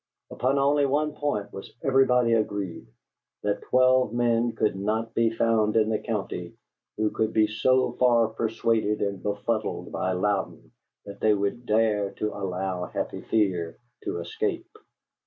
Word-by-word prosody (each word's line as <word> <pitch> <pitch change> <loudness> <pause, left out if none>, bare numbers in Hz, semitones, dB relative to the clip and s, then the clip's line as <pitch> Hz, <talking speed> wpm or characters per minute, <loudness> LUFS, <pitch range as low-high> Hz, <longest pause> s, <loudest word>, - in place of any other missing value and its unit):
Upon 130 +3 0
only 140 +1 +3
one 150 +2 0
point 145 -10 -3
was 95 - -9
everybody 125 -3 +3
agreed: 100 - -2 0.6
that 105 0 -1
twelve 130 -2 +3
men 120 -1 +1
could 105 -2 +1
not 110 +3 -2
be 115 -1 +3
found 115 -1 +1
in 110 -1 +3
the 110 - 0
county 95 -6 -4 0.4
who 110 0 +1
could 110 0 -1
be 110 -1 +4
so 130 +4 +2
far 120 -3 +4
persuaded 110 -1 0
and 100 -2 -3
befuddled 105 +2 -2
by 95 - -1
Louden 90 -10 -2 0.3
that 100 0 -9
they 110 -1 +3
would 100 +5 -3
dare 105 -2 +1
to 105 - -3
allow 95 -1 -3
Happy - - -4
Fear 90 -7 0 0.3
to - - -3
escape. 425 -4 -3
110 Hz, 145 wpm, -26 LUFS, 100-120 Hz, 0.6 s, be